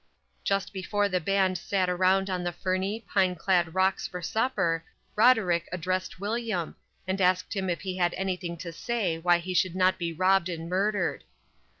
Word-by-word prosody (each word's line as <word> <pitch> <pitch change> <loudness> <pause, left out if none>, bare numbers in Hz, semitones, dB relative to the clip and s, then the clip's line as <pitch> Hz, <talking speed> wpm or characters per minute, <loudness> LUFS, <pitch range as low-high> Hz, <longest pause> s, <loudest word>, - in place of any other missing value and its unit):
Just 195 0 -1
before 205 +2 0
the 185 -2 0
band 190 +1 +1
sat 185 +1 0
around 185 +2 +2
on 185 -2 -2
the 175 - -1
ferny, 190 +5 -2
pine 185 -2 +2
clad 175 -1 +1
rocks 190 0 +2
for 180 - -6
supper, 170 -4 0 0.3
Roderick 210 -8 +4
addressed 185 +1 -2
William, 210 -4 -2 0.3
and 190 +1 -1
asked 185 +2 +2
him 190 -2 -1
if 175 - -2
he 185 -1 -4
had 175 -1 +1
anything 180 -2 -3
to 170 +1 -6
say 190 -4 -1
why 175 +1 +4
he 180 +2 -5
should 180 0 +1
not 185 0 +2
be 170 -1 -2
robbed 185 +2 +2
and 165 -1 -5
murdered. 195 +1 0
185 Hz, 175 wpm, -27 LUFS, 175-195 Hz, 0.3 s, Roderick